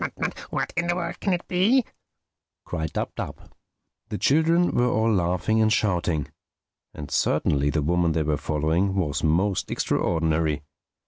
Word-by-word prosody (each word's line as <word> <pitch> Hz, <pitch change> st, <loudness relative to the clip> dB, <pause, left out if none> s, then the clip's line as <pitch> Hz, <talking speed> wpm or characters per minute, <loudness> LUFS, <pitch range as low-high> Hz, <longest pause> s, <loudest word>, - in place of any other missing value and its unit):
"What -, -, -2 dB
in 170 Hz, -1 st, 0 dB
the 175 Hz, -, +1 dB
world 170 Hz, -1 st, -4 dB
can 195 Hz, -, 0 dB
it 175 Hz, -1 st, -2 dB
be?" 215 Hz, +8 st, +3 dB, 0.8 s
cried 80 Hz, -1 st, -3 dB
Dab -, -, -3 dB
Dab. -, -, -7 dB, 0.6 s
The 105 Hz, -, -3 dB
children 165 Hz, +7 st, +3 dB
were 125 Hz, 0 st, +2 dB
all 110 Hz, 0 st, +2 dB
laughing 90 Hz, +4 st, +1 dB
and 110 Hz, 0 st, +3 dB
shouting. 85 Hz, -, 0 dB, 0.7 s
And 75 Hz, -, -8 dB
certainly 70 Hz, 0 st, +1 dB
the 75 Hz, 0 st, 0 dB
woman 85 Hz, +1 st, +2 dB
they 80 Hz, 0 st, +1 dB
were 75 Hz, 0 st, 0 dB
following 80 Hz, +7 st, 0 dB
was 75 Hz, -7 st, -1 dB
most 90 Hz, +5 st, +1 dB
extraordinary. 80 Hz, -3 st, 0 dB
90 Hz, 145 wpm, -25 LUFS, 80-125 Hz, 0.8 s, be